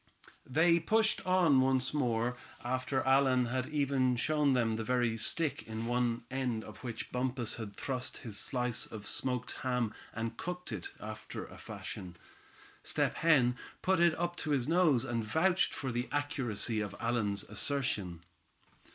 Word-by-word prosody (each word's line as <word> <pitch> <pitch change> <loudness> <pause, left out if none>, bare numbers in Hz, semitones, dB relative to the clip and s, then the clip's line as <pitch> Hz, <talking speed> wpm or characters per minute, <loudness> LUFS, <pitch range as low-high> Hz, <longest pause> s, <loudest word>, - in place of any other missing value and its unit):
They 170 +5 +4
pushed 220 +5 +2
on 175 -8 +5
once 130 0 +2
more, 120 -4 +1 0.3
after 130 +2 -1
Allan 130 -1 +4
had 130 +1 -1
even 135 -4 +1
shown 150 +2 +2
them 115 -3 +2
the 110 - -2
very 120 -1 +1
stick 145 +7 +1
on 110 +1 -3
one 120 -1 0
end 125 -4 -1
of 105 - -10
which 115 -3 -5
Bumpus 125 -2 -1
had 105 -3 -6
thrust 130 0 -2
his 110 -4 -4
slice 125 +1 -1
of 105 -2 -8
smoked 125 +2 -1
ham, 125 -4 0 0.2
and 115 0 -4
cooked 180 -4 -4
it, 100 -6 -4
after 110 0 -7
a - - -13
fashion. 90 -2 -7 0.6
Step - - 0
Hen 135 -7 +4 0.3
put 190 -1 +3
it 170 -1 +4
up 175 +1 -1
to 155 - -2
his 140 -4 +1
nose, 160 -7 +4
and 120 -3 -1
vouched 175 +12 +2
for 135 -2 -3
the 120 +2 -2
accuracy 130 -7 -1
of 100 -2 -4
Allan's 105 -4 0
assertion. 100 - -1
125 Hz, 155 wpm, -33 LUFS, 115-145 Hz, 0.6 s, on